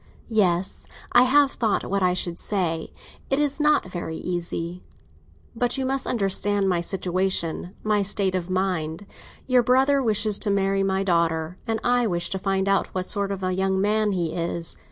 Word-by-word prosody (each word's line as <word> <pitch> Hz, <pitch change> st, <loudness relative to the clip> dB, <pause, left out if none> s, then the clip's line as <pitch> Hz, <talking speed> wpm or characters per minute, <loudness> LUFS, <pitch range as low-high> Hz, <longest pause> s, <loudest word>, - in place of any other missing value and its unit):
"Yes; 190 Hz, -4 st, +1 dB, 0.2 s
I 245 Hz, +1 st, +6 dB
have 280 Hz, +1 st, +4 dB
thought 220 Hz, -4 st, 0 dB
what 200 Hz, +1 st, 0 dB
I 180 Hz, -1 st, +2 dB
should 175 Hz, -2 st, -3 dB
say. 170 Hz, -6 st, -2 dB, 0.4 s
It 270 Hz, -, +2 dB
is 290 Hz, 0 st, +1 dB
not 300 Hz, 0 st, +3 dB
very 160 Hz, -3 st, -4 dB
easy." 175 Hz, 0 st, -4 dB, 0.7 s
"But 245 Hz, +2 st, 0 dB
you 265 Hz, -, -1 dB
must 270 Hz, 0 st, -1 dB
understand 200 Hz, -2 st, +1 dB
my 175 Hz, -2 st, +1 dB
situation—my 185 Hz, +2 st, -1 dB
state 195 Hz, -1 st, 0 dB
of 185 Hz, -1 st, -2 dB
mind. 185 Hz, -2 st, -1 dB, 0.4 s
Your 255 Hz, -1 st, +4 dB
brother 265 Hz, +3 st, +3 dB
wishes 215 Hz, -3 st, +1 dB
to 210 Hz, -, 0 dB
marry 195 Hz, 0 st, +1 dB
my 195 Hz, 0 st, +1 dB
daughter, 170 Hz, -2 st, 0 dB
and 225 Hz, -1 st, 0 dB
I 245 Hz, -1 st, +2 dB
wish 175 Hz, -3 st, -2 dB
to 190 Hz, -, -1 dB
find 195 Hz, 0 st, 0 dB
out 195 Hz, 0 st, +2 dB
what 185 Hz, -1 st, -1 dB
sort 200 Hz, 0 st, 0 dB
of 195 Hz, -1 st, -4 dB
a 185 Hz, 0 st, 0 dB
young 190 Hz, 0 st, 0 dB
man 210 Hz, +1 st, +1 dB
he 170 Hz, -3 st, -1 dB
is. 170 Hz, 0 st, -2 dB
195 Hz, 175 wpm, -24 LUFS, 180-220 Hz, 0.7 s, I